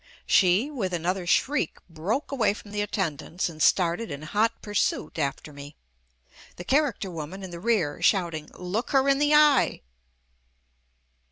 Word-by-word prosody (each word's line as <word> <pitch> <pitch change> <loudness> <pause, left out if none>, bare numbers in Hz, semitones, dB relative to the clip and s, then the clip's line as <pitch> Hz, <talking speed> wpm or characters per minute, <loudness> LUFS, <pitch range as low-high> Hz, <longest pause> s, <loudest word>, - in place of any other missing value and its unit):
She, 195 +9 +3
with 200 -10 -3
an 170 -1 -5
other 180 0 -1
shriek, 285 +10 +1
broke 185 - -3
away 225 -7 +1
from 205 - -12
the 205 0 -2
attendants 180 -4 -2
and 155 -2 -10
started 180 +7 +2
in 140 0 -6
hot 210 +8 0
pursuit 205 -6 -1
after 145 +1 -3
me 145 +1 -11 0.4
— - - -24
the 175 - -8
char 285 +7 +2
acter 195 -3 -7
woman 165 +5 -7
in 185 - -7
the 170 - -7
rear 175 -8 0
shouting, 170 -5 +1
"Look 180 +6 -3
her 270 0 +4
in 275 0 +3
the 295 +1 +3
eye." 300 -3 +4
190 Hz, 165 wpm, -26 LUFS, 165-230 Hz, 0.4 s, her